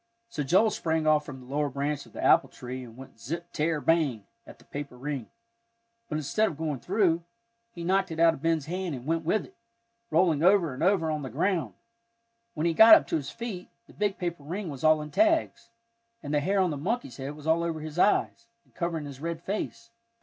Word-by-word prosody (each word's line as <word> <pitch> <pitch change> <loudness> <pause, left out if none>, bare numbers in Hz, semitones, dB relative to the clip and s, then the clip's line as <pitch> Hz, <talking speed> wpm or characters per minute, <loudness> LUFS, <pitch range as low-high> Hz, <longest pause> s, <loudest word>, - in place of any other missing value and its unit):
So 160 - -4
Joel 190 +10 +3
sprang 160 -1 -1
off 155 -1 +3
from 135 -3 -8
the - - -13
lower 145 +3 -1
branch 140 +1 -3
of - - -20
the - - -6
apple - - +5
tree 125 +1 -7
and 115 -1 -13
went 130 -3 -13
zip 170 +8 -6
tear 155 0 0
bang, 145 -10 +1 0.2
at - - -12
the - - -21
paper 140 -3 -7
ring. 135 -3 -5 0.8
But 150 - -1
instead 185 +9 +1
of 155 - -5
going 155 -4 -3
through, 175 - +1 0.5
he 170 -7 -9
knocked 190 +2 +1
it 160 -1 -6
out 165 0 +6
of 145 - -10
Ben's 165 -2 +1
hand, 180 -1 -3
and 125 -1 -9
went 165 +1 0
with 195 +7 0
it, 375 - -18 0.6
rolling 165 -4 +3
over 180 -4 +4
and 130 - -8
over 180 -4 +2
on 155 -1 -2
the 135 - -5
ground. 170 +4 -1 0.8
When 155 +1 -1
he 170 - +2
got 220 +6 +10
up - - +2
to - - 0
his 145 -3 -2
feet, 215 -7 -6 0.2
the - - -18
big 205 -2 -1
paper 175 -3 -4
ring 175 +6 -5
was 135 0 -9
all 155 -1 +4
in 150 - -9
tags, 325 - +1 0.5
and 145 - -4
the 150 - +3
hair 195 +7 +1
on 185 -3 +2
the 145 - -3
monkey's 155 - -3
head 140 +2 -5
was 150 0 -12
all 160 +1 +3
over 165 -2 -2
his 155 +2 -6
eyes, 220 +3 +2 0.2
and - - -31
covering 170 -3 -3
his 140 -1 -9
red 165 0 -4
face. 215 +3 -4
160 Hz, 225 wpm, -28 LUFS, 145-180 Hz, 0.8 s, got